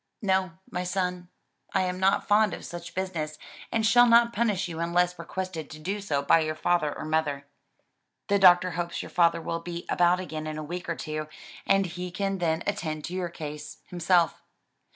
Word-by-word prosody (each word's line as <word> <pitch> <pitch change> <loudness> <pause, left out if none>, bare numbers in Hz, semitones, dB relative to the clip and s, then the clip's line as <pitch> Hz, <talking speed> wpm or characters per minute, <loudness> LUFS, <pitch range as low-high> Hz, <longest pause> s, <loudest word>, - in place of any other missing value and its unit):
"No, 190 -2 +1 0.2
my 180 0 -2
son, 180 -1 -2 0.5
I 190 - +3
am 180 0 -2
not 190 +1 +2
fond 210 -2 +4
of - - -10
such 175 0 -8
business 165 -5 -3 0.3
and 225 -1 +1
shall 245 +2 +6
not 235 0 +5
punish 210 -5 0
you 165 -2 -6
unless 175 +1 +1
requested 175 -1 -5
to 155 - -9
do 195 +6 -3
so 145 -8 -1
by 165 - +5
your 155 -1 -1
father 155 -2 +1
or - - -6
mother. 150 -3 -1 0.8
The 200 0 +3
doctor 180 -1 +6
hopes 170 +1 -3
your - - -10
father 170 -1 +3
will 165 +1 -2
be 170 0 -6
about 175 +1 +3
again 155 -4 -5
in 155 0 -4
a 155 - -4
week 175 +4 -6
or 170 - 0
two, 155 -1 -4 0.4
and 195 0 +4
he 180 +1 -5
can 195 +1 -2
then 160 -2 0
attend 155 -7 -3
to 175 - -6
your 185 -2 -2
case 150 -2 -7
himself." 175 -1 +2
175 Hz, 195 wpm, -27 LUFS, 160-190 Hz, 0.8 s, shall